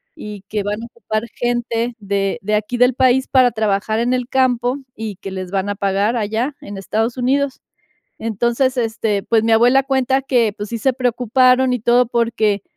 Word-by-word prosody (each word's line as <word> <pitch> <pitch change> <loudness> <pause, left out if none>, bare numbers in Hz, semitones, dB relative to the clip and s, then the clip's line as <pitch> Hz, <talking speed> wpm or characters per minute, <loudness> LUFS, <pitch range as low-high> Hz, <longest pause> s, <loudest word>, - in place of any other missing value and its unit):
y 210 -2 -9
que 210 -1 -2
van 210 +2 -3
a - - -5
ocupar 230 -2 -4
gente 240 -1 -1
de 200 +1 -1
de 210 +2 0
aquí 215 +3 -2
del 250 +1 +4
país 260 0 +3
para 255 -2 +4
trabajar 215 0 0
en 245 +2 +1
el 250 0 -2
campo 250 0 +1 0.2
y 215 -3 -6
que 195 - -8
les 185 -1 -6
van 195 0 -1
a 205 - -2
pagar 200 +3 0
allá 225 +6 -2
en 200 -1 -8
Estados 225 +5 -2
Unidos. 270 +2 0 0.6
Entonces, 235 +4 0
este, 220 -3 -1
pues, 225 -1 +2
mi 225 - +1
abuela 245 +4 +4
cuenta 265 0 +1
que, 240 -5 +2
pues, 205 0 -5
sí 230 -1 -4
se 265 +4 +2
preocuparon 250 +1 +2
y 250 - -1
todo 240 +2 +3
porque, 230 -4 0
235 Hz, 190 wpm, -19 LUFS, 210-250 Hz, 0.6 s, del